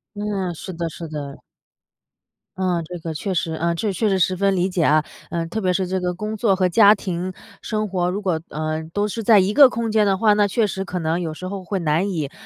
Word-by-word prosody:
嗯， 205 -3 -2
是 185 +3 -7
的， 170 0 -3
是 165 +1 -8
的。 145 -3 -6 1.2
嗯， 180 -3 0
这 180 +2 -7
个 165 0 -5
确 190 +5 -3
实， 165 -1 -1
呃， 170 +1 -1
确 205 +3 -1
实 195 0 +1
十 185 +1 +2
分 195 +1 +1
理 180 0 +1
解 180 -3 0
啊。 155 0 +3 0.2
呃， 170 -1 -2
特 220 +7 -4
别 185 -2 +1
是 185 +1 0
这 190 +1 -1
个 180 -1 -2
工 210 +4 -4
作 210 -2 +2
和 185 -1 +2
家 205 +3 +6
庭 185 -2 -4 0.3
生 215 -1 -2
活 180 -2 -1
如 190 +3 -2
果， 180 -6 -1
呃， 155 +1 -3
都 205 0 0
是 225 +2 -4
在 220 0 +5
一 190 +2 +1
个 280 0 +8
空 230 -2 -2
间 215 -1 +3
的 195 -1 +2
话， 210 +1 +4
那 205 0 +3
确 220 +3 +1
实 190 -1 -3
可 185 -2 -5
能 165 +1 -1
有 160 -2 -4
时 185 - -7
候 195 0 -5
会 195 +2 -3
难 170 +3 +1
以， 155 -7 -3
185 Hz, 260 characters per minute, -21 LUFS, 170-205 Hz, 1.2 s, 个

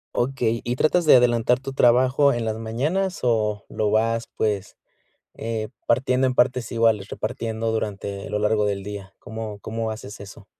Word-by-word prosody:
Okey, 120 -2 0
¿y 120 +1 -2
tratas 170 +6 +2
de 155 - +8
adelantar 120 0 +3
tu 135 +1 -6
trabajo 130 +3 +4
en 120 -1 -2
las 110 0 -2
mañanas 150 +13 -1
o 105 -4 0
lo 105 - -1
vas, 115 +2 +1
pues, 105 -3 -1 0.6
eh, 110 -1 -4 0.2
partiendo 130 +2 +2
en 130 - -1
partes 125 -2 +1
iguales, 115 -4 +2
repartiendo 115 0 -3
durante 100 -2 -4
lo 105 - -1
largo 105 0 +2
del 100 -1 -2
día? 100 -1 -8
¿Cómo 110 -1 -7
cómo 115 +1 -3
haces 110 -1 -7
eso? 100 +1 -11
115 Hz, 165 wpm, -23 LUFS, 105-125 Hz, 0.6 s, de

